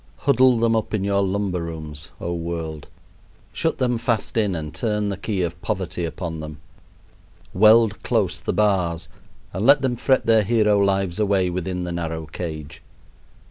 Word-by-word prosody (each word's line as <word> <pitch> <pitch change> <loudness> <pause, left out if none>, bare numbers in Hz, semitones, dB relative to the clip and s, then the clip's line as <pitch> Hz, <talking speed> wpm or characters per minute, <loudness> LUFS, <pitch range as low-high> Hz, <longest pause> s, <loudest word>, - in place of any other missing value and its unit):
Huddle 130 -2 +4
them 115 0 +2
up 110 0 -1
in 100 - -1
your 100 0 +1
lumber 95 -2 -1
rooms, 80 -2 -7
oh, 85 - -3
world! 85 -2 -5 0.7
Shut - - 0
them 125 -2 0
fast 115 -2 -1
in 105 -5 +1
and 75 -2 -5
turn 105 -3 -1
the 100 - -2
key 100 -1 -2
of 85 0 -4
poverty 90 -1 -3
upon 80 -1 -5
them. 75 0 -8 0.9
Weld 110 +2 +5
close - - 0
the - - -2
bars, 85 -6 0 0.4
and 95 +3 -3
let 140 +3 +6
them 125 -2 +1
fret 130 +2 +1
their 115 -1 +5
hero 105 -1 +2
lives 95 -1 +1
away 100 -3 +2
within 90 0 -3
the 90 - -4
narrow 80 -2 -4
cage. 75 -1 -7
95 Hz, 165 wpm, -22 LUFS, 85-110 Hz, 0.9 s, let